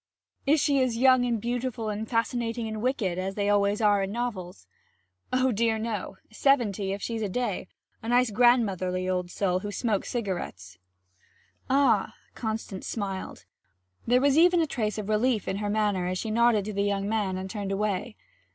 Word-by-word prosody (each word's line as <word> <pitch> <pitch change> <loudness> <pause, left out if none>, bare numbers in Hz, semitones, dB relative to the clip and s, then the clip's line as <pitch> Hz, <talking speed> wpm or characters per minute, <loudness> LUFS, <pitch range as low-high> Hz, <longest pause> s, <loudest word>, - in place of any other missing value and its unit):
'Is 300 +3 +4
she 280 -1 +2
as 250 -3 0
young 255 0 +5
and 235 -2 0
beautiful 240 0 -3
and 215 +1 -4
fascinating 230 0 -1
and 215 -1 -5
wicked 220 -8 -1
as 190 +1 -3
they 205 -1 0
always 205 +1 +2
are 205 -2 +4
in 195 0 -2
novels?' 195 - -4 0.7
'Oh, 255 0 +2
dear 225 0 +1
no! 215 -4 -4
Seventy, 220 -6 +1
if 200 +1 -4
she's 230 -1 -3
a 210 - -1
day. 245 +6 -2 0.3
A 225 - -5
nice 245 -1 +3
grandmotherly 200 -6 +2
old 180 -1 -1
soul 185 -1 0
who 205 +2 -5
smokes 210 -2 -1
cigarettes.' 175 - -4 0.9
'Ah!' 275 +1 +3 0.2
Constance 220 -4 -4
smiled; 195 -4 -5 0.6
there 245 +2 +4
was 285 +2 +4
even 350 +1 +5
a 325 - +3
trace 220 -8 -2
of 210 -2 -4
relief 215 +1 +1
in 190 - -1
her 205 0 -2
manner 205 -4 0
as 185 0 -2
she 220 +3 -3
nodded 230 -2 +3
to 215 - -4
the 200 - -1
young 200 0 0
man 205 -4 -1
and 190 0 -4
turned 200 0 -4
away. 210 +2 -2
215 Hz, 180 wpm, -27 LUFS, 195-240 Hz, 0.9 s, young